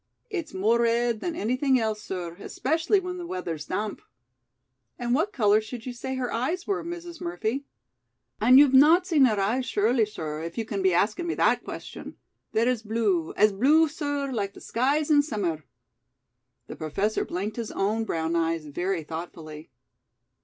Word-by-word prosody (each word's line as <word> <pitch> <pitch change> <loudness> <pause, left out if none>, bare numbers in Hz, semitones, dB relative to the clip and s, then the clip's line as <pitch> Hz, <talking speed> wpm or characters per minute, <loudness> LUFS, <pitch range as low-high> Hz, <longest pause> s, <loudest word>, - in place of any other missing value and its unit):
"It's 340 -7 -4
more 220 +5 +2
red 235 -1 +1
than 340 +5 -3
anything 255 +3 +1
else, 220 -2 -1
sir, 180 -4 -5
especially 325 - 0
when 365 -1 -5
the 350 -1 -6
weather's 170 - -5
damp." 210 - -3 1.0
"And 240 0 -1
what 330 +10 +1
color 215 -3 +3
should 225 +1 -8
you 250 - -4
say 265 +2 -5
her 255 -2 -3
eyes 320 +10 -1
were, 395 - -1
Mrs. 345 0 -7
Murphy?" 220 +11 -2 0.7
"An' 250 +4 +7
you've 280 -1 +7
not 315 +7 +7
seen 315 -7 +4
her 215 -5 +2
eyes, 235 +6 0
surely, 225 +1 +2
sir, 155 -6 -5
if 165 +1 -6
you 225 - -1
can 205 -2 -3
be 190 0 +3
askin' 210 - +1
me 340 - -1
that - - +2
question. - - -8 0.4
They're 225 +2 +2
as 250 -3 +1
blue 210 -7 0
as 210 +1 +5
blue, 295 +10 +4
sir, 285 -2 -3
like 200 -5 -3
the - - -11
skies 285 +6 0
in 290 -1 +6
summer." 185 - -3 1.0
The - - -8
Professor 195 +8 -1
blinked 205 +5 -4
his 230 -2 -4
own 215 +3 0
brown 165 -5 -2
eyes 165 -1 0
very 175 +4 -2
thoughtfully. 160 -1 -8
225 Hz, 175 wpm, -26 LUFS, 195-280 Hz, 1.0 s, An